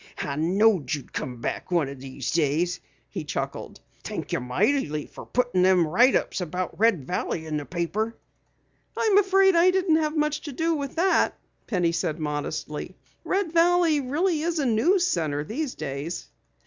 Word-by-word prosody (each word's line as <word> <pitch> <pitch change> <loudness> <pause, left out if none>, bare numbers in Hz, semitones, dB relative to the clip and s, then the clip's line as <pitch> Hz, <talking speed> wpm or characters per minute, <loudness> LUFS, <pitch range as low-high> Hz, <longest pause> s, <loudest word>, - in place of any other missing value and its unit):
I 140 - -3
knowed 180 - +2
you'd 140 - -11
come 125 -2 -5
back - - -4
one 170 -5 +2
o' 140 - -6
these 130 -1 -6
days," 170 +3 +1 0.3
he - - -4
chuckled. - - -5 0.2
"Thank - - -5
ye - - 0
mightily 150 - 0
fer - - -11
puttin' 245 -7 +1
them 185 -2 +5
write 240 - +4
ups - - -1
about 180 +3 -4
Red 205 - +3
Valley 165 0 -2
in 155 -1 -2
the 145 - -5
paper." 210 +6 -2 0.8
"I'm 420 -3 +4
afraid 385 -1 +4
I 340 +2 +6
didn't 365 -3 +3
have 310 0 -1
much 300 0 0
to 290 - -7
do 330 +5 0
with 280 -3 -4
it," 375 +3 +3 0.3
Penny 180 -6 +1
said 165 -2 -1
modestly. 150 +2 -4 0.3
"Red 380 -4 -1
Valley 340 -2 +4
really 305 +5 0
is 335 +1 -1
a 290 - 0
news 335 - +3
center 155 - -1
these 255 - -4
days." 145 +3 -5
205 Hz, 170 wpm, -25 LUFS, -, 0.8 s, I